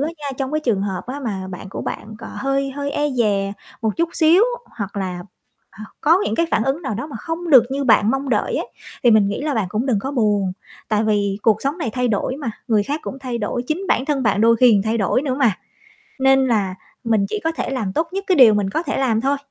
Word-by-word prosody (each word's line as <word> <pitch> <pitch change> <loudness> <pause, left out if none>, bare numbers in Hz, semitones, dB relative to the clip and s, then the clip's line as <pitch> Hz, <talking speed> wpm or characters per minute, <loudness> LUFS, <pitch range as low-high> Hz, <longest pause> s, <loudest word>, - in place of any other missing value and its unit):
á 295 - 0
nha, 290 - -7
trong 270 0 -3
cái 310 - 0
trường 220 -9 0
hợp 190 -3 -3
á 270 +3 -5
mà 195 -7 -4
bạn 185 +1 -8
của 195 - -6
bạn 215 +1 -6
còn 225 - -9
hơi 275 0 -1
hơi 280 +1 -4
e 295 0 0
dè 205 -5 0 0.3
một 220 -2 -1
chút 335 0 +1
xíu 335 +5 +5 0.4
hoặc 200 0 -5
là 180 -2 -3 0.6
h - - -9 0.2
có 325 +4 +5
những 220 - -1
cái 335 - +2
phản 225 - +2
ứng 270 +6 -1
nào 265 -9 -3
đó 240 +8 -4
mà 295 - -9
không 330 +1 -4
được 260 -5 +8
như 280 +1 -1
bạn 220 -3 +4
mong 270 0 -2
đợi 480 - 0
á, - - -1 0.4
thì 240 - +6
mình 215 -2 +5
nghĩ 200 - -3
là 295 -1 -1
bạn 220 -5 0
cũng 220 +6 -1
đừng 230 -7 +1
có 270 - -4
buồn. 210 -7 +1 0.4
Tại 215 0 +2
vì 205 -2 +1
cuộc 215 -1 +2
sống 280 +4 -1
này 310 -10 -2
thay 250 +2 0
đổi 225 +4 -1
mà, 260 -7 -4 0.2
người 215 -3 +3
khác 295 +6 -3
cũng 270 - -6
thay 250 -3 -4
đổi, 235 +2 -2
chính 310 +4 -1
bản 260 - +1
thân 280 -3 0
bạn 210 -2 +2
đôi 230 +1 +5
khi 245 0 +5
còn 200 - +3
thay 220 +1 0
đổi 215 +4 +1
nữa 265 -3 -1
mà, 260 -6 +3 0.7
nên 270 0 +4
là 205 -6 0 0.3
mình 220 -3 +2
chỉ 425 - -3
có 325 - +1
thể - - -4
làm 220 -8 -2
tốt 320 - -1
nhất 390 +1 -3
cái 370 - +3
điều 230 -6 +8
mình 200 -2 0
có 320 - -1
thể 280 - -3
làm 240 -5 +1
thôi, 275 +3 +1
245 Hz, 265 wpm, -20 LUFS, 210-280 Hz, 0.7 s, được